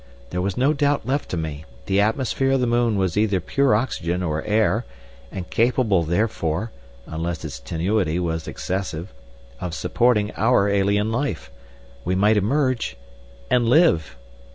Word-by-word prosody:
There 90 - -1
was 95 0 -2
no 135 +4 +3
doubt 145 -1 +1
left 140 +3 -1
to 90 - -3
me; 80 -2 -4 0.2
the 95 +1 +2
atmosphere 130 +4 +1
of 135 - +2
the 125 - +1
moon 120 -2 +2
was 95 -3 0
either 105 -3 +2
pure 135 +6 +2
oxygen 90 -6 -1
or 75 -3 -1
air, 110 +2 +2 0.5
and 90 -1 -6
capable 115 -5 +2
therefore—unless 85 - -3
its 70 -5 -6
tenuity 85 - -1
was 80 -2 -2
excessive—of 80 -6 -6
supporting 110 -1 +1
our 110 -3 +3
alien 100 +2 +1
life. 120 - -2 0.5
We 90 - 0
might 105 +3 +3
emerge—and 100 - -1
live! 135 - +3
100 Hz, 135 wpm, -22 LUFS, 80-120 Hz, 0.5 s, no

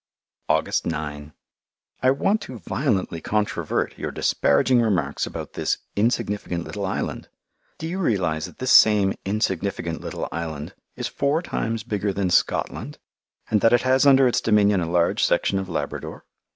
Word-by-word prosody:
August - - +1
9 75 -2 -4 0.7
I 130 - +4
want 200 +11 +1
to 130 - -8
violently 100 - -1
controvert 105 0 -1
your - - -3
disparaging 120 - +2
remarks 105 -6 0
about - - -7
this - - -1 0.2
"insignificant 105 -5 -1
little 100 +2 -4
island." 95 - -4 0.5
Do 160 - -5
you 180 +3 -3
realize 90 - 0
that - - -15
this 130 0 -1
same 105 -3 +6
"insignificant 95 -4 -2
little - - -4
island" 80 -3 -5 0.2
is - - -3
four 145 +5 0
times 115 - -3
bigger 105 -3 -1
than 95 -1 -1
Scotland, - - 0 0.5
and 105 -2 +3
that 115 - +4
it 120 - +4
has 130 +2 +3
under 135 -1 +6
its 120 - +1
dominion 105 -3 +3
a 85 - -2
large 85 0 +2
section 95 - +2
of 95 -1 -5
Labrador? 85 - -5
105 Hz, 150 wpm, -23 LUFS, 85-120 Hz, 0.7 s, same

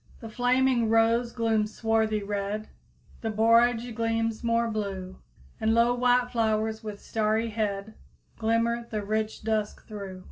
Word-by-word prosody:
"The 225 - -8
flaming 245 0 +2
rose 230 +1 +3
glooms 225 -2 0
swarthy 220 -2 +1
red; 205 +1 -3 0.5
The 225 - -2
borage 230 +2 +3
gleams 225 0 -1
more 230 0 +2
blue; 195 -4 -4 0.4
And 220 +1 +2
low 235 +1 +4
white 245 0 +2
flowers, 220 -1 0
with 210 -2 -6
starry 220 +1 0
head, 210 -1 -2 0.5
Glimmer 230 +1 +1
the 215 -2 -3
rich 215 +1 -2
dusk 215 -1 -2
through." 200 -3 -7
225 Hz, 135 wpm, -27 LUFS, 215-230 Hz, 0.5 s, low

